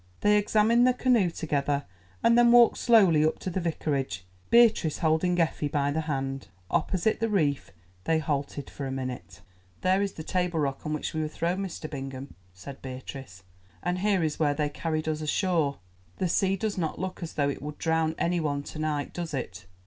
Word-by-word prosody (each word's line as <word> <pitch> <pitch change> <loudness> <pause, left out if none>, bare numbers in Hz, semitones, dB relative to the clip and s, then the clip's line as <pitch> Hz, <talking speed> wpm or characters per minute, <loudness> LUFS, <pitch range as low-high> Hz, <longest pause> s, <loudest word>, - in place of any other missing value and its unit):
They 210 0 +4
examined 220 +4 +4
the 250 - +3
canoe 245 -8 +3
together, 145 -3 -1 0.4
and 230 0 +5
then 240 0 +6
walked 240 -1 +6
slowly 195 -10 +5
up 155 - +1
to 185 - -5
the 185 - -1
Vicarage, 140 - -2 0.2
Beatrice 225 -9 +4
holding 170 +2 +1
Effie 160 -2 +1
by 145 -1 0
the 160 +2 -1
hand. 135 -3 -3 0.2
Opposite 185 +6 +1
the 225 0 0
reef 150 -9 0 0.4
they 160 - +2
halted 145 -2 -3
for 140 - -6
a - - -4
minute. 125 -8 -6 0.4
"There 185 +1 +2
is 200 -1 -1
the 160 - -7
Table 180 -1 -1
Rock 140 0 -2
on 155 - -1
which 150 - -3
we 155 - -1
were 155 - -1
thrown, 170 +4 -2
Mr. 185 -5 -5
Bingham," 135 -2 -7 0.2
said 130 +10 -11
Beatrice, 130 -6 -8 0.4
"and 180 +1 -1
here 195 -2 +2
is 155 -1 -2
where 145 -2 +2
they 150 0 0
carried 155 +1 -3
us 155 0 -1
ashore. 155 -2 0 0.4
The 185 - 0
sea 190 +3 +2
does 200 0 -2
not 160 -3 -2
look 185 +2 -5
as 170 - -5
though 140 -1 +1
it 140 - -5
would 150 +1 -6
drown 160 -1 0
any 175 +1 0
one 145 -3 -1
to 155 - -8
night, 150 -2 -2
does 170 -4 -4
it? 100 -7 -6
160 Hz, 195 wpm, -27 LUFS, 140-185 Hz, 0.4 s, then